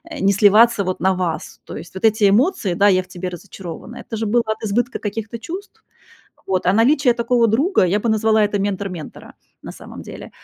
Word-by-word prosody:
э, - - -7
не 195 - +3
сливаться 210 +2 +5
вот 185 -1 -3
на 190 +2 +3
вас. 180 -4 -4
То - - -9
есть 165 +3 -11
вот 190 - -2
эти 215 -2 +4
эмоции: 245 - +1
"Да, 200 +3 +4
я 185 -1 +3
в - - -22
тебе 185 0 -6
разочарована"- 185 +4 -9
это 225 - -3
же 220 - -2
было 235 +3 +2
от 220 0 -4
избытка 240 +5 -1
каких-то 225 +2 -5
чувств, 370 - -9 0.6
вот, 185 -1 -1
а 185 - +3
наличие 250 +4 +3
такого 235 0 +1
друга, 270 - +2
я 190 +4 +1
бы 230 - -1
назвала 220 0 +2
это 205 0 0
"ментор 200 0 -2
ментора", 170 -5 -10 0.3
на - - -7
самом - - -11
деле, - - -10
210 Hz, 215 wpm, -20 LUFS, 190-235 Hz, 0.6 s, сливаться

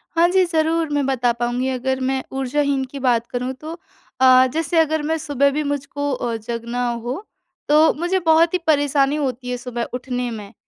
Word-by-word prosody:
हाँ 340 +1 +5
जी, 375 -1 +4
ज़रूर 325 -1 0
मैं 285 -2 +1
बता 250 -3 +1
पाऊँगी 245 +2 -1
अगर 260 +1 -1
मैं 265 -1 -1
ऊर्जाहीन 275 +1 0
की 280 - -6
बात 240 -3 +1
करूँ 250 +1 -3
तो 315 +2 -6 0.5
अ, 255 0 +7
जैसे 325 +1 -1
अगर 315 -1 +2
मैं 320 +2 0
सुबह 280 -3 +1
भी 300 +2 -1
मुझको 285 0 -3
अ, 240 -2 -2
जगना 235 +2 -3 0.2
हो 270 - -5 0.4
तो 305 +2 +5
मुझे 350 +4 -1
बहुत 325 +2 +4
ही - - +3
परेशानी 285 -1 +2
होती 260 -4 -3
है 250 - -2
सुबह 240 -1 -4
उठने 250 -1 -3
में। 210 -3 -8
275 Hz, 185 wpm, -21 LUFS, 250-310 Hz, 0.5 s, अ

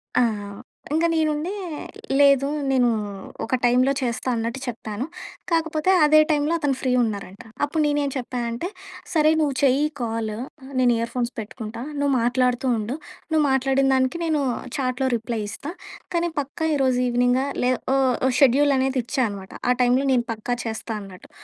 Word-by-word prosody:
ఆ! - - +5 0.7
ఇంక 330 +1 +2
నేనుండి, 310 +2 0 0.7
"లేదు 275 -1 +5 0.2
నేను 250 -2 +3 0.6
ఒక 225 - -6
టైమ్‌లో 250 +3 +4
చేస్తా" 245 +1 -2
అన్నట్టు 230 +3 -2
చెప్పాను. 225 0 -4 0.5
కాకపోతే 320 +1 +1
అదే 310 +1 +6
టైమ్ 295 -1 +2
లో - - +1
అతను 285 -3 +1
ఫ్రీ 255 - 0
ఉన్నారంట. 200 -3 -4 0.2
అప్పుడు 310 +2 0
నేనేం 290 -1 +1
చెప్పా 250 -1 -3
అంటే 235 +10 -3 0.5
"సరే! 310 -1 +4
నువ్వు 290 -3 +1
చెయ్యి 280 +2 +4
కాల్ 225 -1 -2 0.5
నేను 245 -1 +4
ఇయర్ 230 0 -2
ఫోన్స్ 245 -1 -1
పెట్టుకుంటా 220 +1 -7 0.2
నువ్వు 285 -1 +1
మాట్లాడుతూ 250 +1 +1
ఉండు. 220 +6 -3 0.3
నువ్వు 315 -1 +3
మాట్లాడిన 270 +1 +2
దానికి 260 +5 +1
నేను 310 -3 +1 0.4
చాట్‍లో 260 0 0
రిప్లై 230 -1 -3
ఇస్తా. 290 +9 -6 0.4
కానీ 340 0 +1
పక్కా 290 +3 -2
ఈరోజు 260 -3 +2
ఈవినింగ్" 245 +1 +2 0.2
లే 250 - +3 0.6
ఉ - - +3
షెడ్యూల్ 280 +2 +5
అనేది 260 0 +1
ఇచ్చా 260 - -1
అన్నమాట. 195 -2 -8 0.2
ఆ - - +6
టైమ్‌లో 250 +3 +3
నేను 240 -1 +2
పక్కా 225 +2 -2
చేస్తా 225 0 -4
అన్నట్టు. 190 -2 -12
260 Hz, 155 wpm, -23 LUFS, 240-290 Hz, 0.7 s, అదే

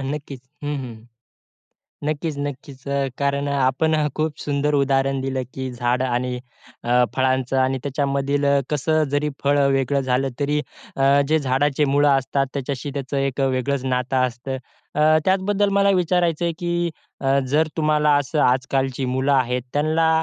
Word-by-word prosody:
नक्कीच. 140 -1 -5 0.2
हं, 145 0 -2
हं. 115 -3 -8 1.0
नक्कीच-नक्कीच. 145 -3 -4
अ, 140 -1 0
कारण 140 0 0
अ, - - -1
आपण 135 +5 +2
अ, 150 -1 +1
खूप 155 -1 -1
सुंदर 145 0 0
उदाहरण 135 -1 +1
दिलं 130 -1 -2
की 130 -1 -4
झाडं 120 +1 0
आणि 125 0 -1 0.5
अ, 125 +1 +4
फळांचं 130 0 +1
आणि 130 0 +1
त्याच्यामधील 140 0 -1
अ, 140 0 +4
कसं 155 +2 +1
अ, - - +3
जरी 150 +1 +1 0.2
फळं 140 0 +3
अ, - - +4
वेगळं 135 +1 +1
झालं, 135 +2 +2
तरी 145 +1 +1 0.4
अ, 140 +1 +4
जे 160 - +3
झाडाचे 140 +1 +1
मूळं 145 +1 +4
असतात 135 +1 -1
त्याच्याशी 140 0 -3
त्याचं 135 +1 -4
एक 135 0 -1
वेगळंच 135 0 0
नातं 130 0 -1
असतं. 125 +2 -5 0.4
अ, 150 - 0 0.2
त्याचबद्दल 195 +2 +2
मला 200 0 +4
विचारायचं 175 -1 +1
आहे 170 - +1
की 175 -1 -2 0.5
अ, 135 0 +2
जर 155 +4 +3
तुम्हाला 150 -1 +2
असं 145 +2 -2
आजकालची 130 +1 +1
मुलं 130 +2 +1
आहेत, 125 -2 +1
त्यांना 155 +2 +2
140 Hz, 160 wpm, -22 LUFS, 130-150 Hz, 1.0 s, अ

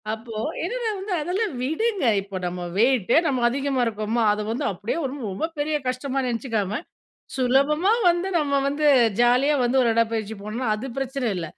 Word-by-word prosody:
அப்போ 225 +1 -11 0.3
என்னென்ன 475 +6 -2
வந்து 385 +1 -6
அதெல்லாம் 380 +4 -1
விடுங்க. 375 - 0 0.2
இப்போ 195 -1 -7
நம்ம 180 0 -4 0.2
வெயிட்டே 240 +1 +3
நம்ம 260 -4 0
அதிகமா 270 0 -1
இருக்கோமா, 220 +1 -1
அத 210 - -3
வந்து 250 +6 -2
அப்டியே 200 - -4
ஒரு 265 - -3 0.2
ரொம்ப 310 +13 -2
பெரிய 305 +1 0
கஷ்டமா 260 +2 -2
நெனச்சிக்காம, 225 -4 -2 0.6
சுலபமா 280 - +3 0.2
வந்து 350 +2 +1
நம்ம 280 -3 +1
வந்து 290 +2 -2 0.4
ஜாலியா 250 +5 +4
வந்து 245 +2 +2
ஒரு 235 - +3
உடப்பயிற்சி 225 -2 0
போனோன்னா, 225 +4 -3
அது 250 +5 -6
பிரச்சன 265 -2 -2
இல்ல. 165 -2 -3
255 Hz, 160 wpm, -24 LUFS, 225-295 Hz, 0.6 s, ஜாலியா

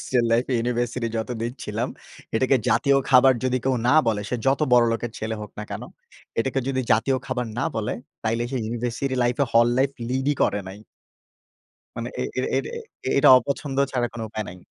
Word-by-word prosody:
Hostel 125 -2 +1
লাইফে 120 +3 +1
university 120 0 -1
যতদিন 115 +1 -3
ছিলাম, - - -2 0.5
এটাকে 130 +3 +3
জাতীয় 140 -2 +3
খাবার 130 +1 +7
যদি 130 0 +1
কেউ 135 0 +2
না 125 - +5
বলে 110 -2 +1
সে 125 - -1
যত 135 +2 +3
বড়লোকের 120 -1 +3
ছেলে 110 +1 -3
হোক 105 - -7
না 105 - -4
কেন, - - -5 0.6
এটাকে 135 +3 0
যদি 130 -1 0
জাতীয় 125 +5 +2
খাবার 125 -2 -2
না 120 - +1
বলে 110 -1 -1 0.3
তাইলে 115 +1 0
সে 135 - -2
ইউনিভার্সিটি 120 +4 -2
লাইফে 120 +3 +2
হল 115 0 +6
লাইফ 135 +1 +3 0.2
লিডই 130 +3 0
করে 105 - +1
নাই। 95 +2 -9 1.2
মানে - - -4
এ - - +1 0.2
এ - - +1 0.2
এটা 135 - -2 0.5
এটা 140 +1 +6
অপছন্দ 135 +2 -3
ছাড়া 125 -2 0
কোন 115 - -6
উপায় 110 0 -4
নাই। 90 - -9
120 Hz, 180 wpm, -24 LUFS, 115-130 Hz, 1.2 s, খাবার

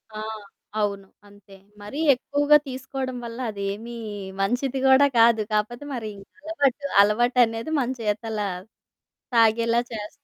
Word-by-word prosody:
ఆ! - - -5 0.6
అవును. 200 -2 -2 0.2
అంతే. 205 -1 -18 0.3
మరీ 210 +9 -7
ఎక్కువగా 290 +3 +3
తీసుకోవడం 260 0 -5
వల్ల 230 +1 -7
అదేమీ 205 +4 -5 0.5
మంచిది 250 +6 0
కూడా 265 +2 +6
కాదు, 230 -1 +5
కాకపోతే 225 +6 -1
మరి 220 -3 -5 0.3
అలవాటు. 290 -4 0 0.2
అలవాటనేది 230 +4 +2
మన 250 -2 0
చేతల 220 +1 -2 1.0
తాగేలా 230 +1 +4
చేస్ 215 -2 -5
230 Hz, 110 wpm, -24 LUFS, 210-260 Hz, 1.0 s, కూడా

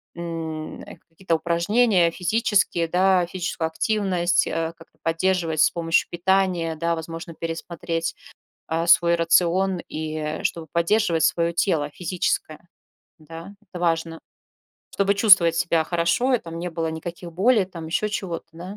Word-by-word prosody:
м, 165 -2 -6 0.3
какие-то 165 +1 -2
упражнения 175 +3 +2
физические, 195 -3 +1
да, 185 +1 +3
физическую 175 -2 -3
активность, 180 -1 0
э, 165 0 -2
как-то 165 - -19
поддерживать 165 -1 0
с - - +6
помощью 165 -1 0
питания, 175 -2 0
да, 170 +1 -1
возможно, 165 +1 -7
пересмотреть, 165 0 -4 0.5
а, 165 +1 -1
свой 170 0 +5
рацион, 175 +2 +2
и 155 0 -4
чтобы 165 -2 -2
поддерживать 170 0 +1
свое 170 +1 +1
тело 165 -4 0
физическое, 175 -1 -3 0.5
да. 165 +5 -11
Это 185 -3 -10
важно. 165 -1 -1 0.7
Чтобы 200 0 +1
чувствовать 195 -5 +6
себя 165 -1 +2
хорошо, 170 +10 +1
и - - +3
там 165 -4 -8
не 180 +1 -3
было 165 -1 -2
никаких 170 +2 -7
болей, 210 +4 +3
там 170 -3 -9
еще 195 +6 -1
чего-то, 180 -5 -4
да. 180 +5 -9
170 Hz, 135 wpm, -23 LUFS, 165-185 Hz, 0.7 s, с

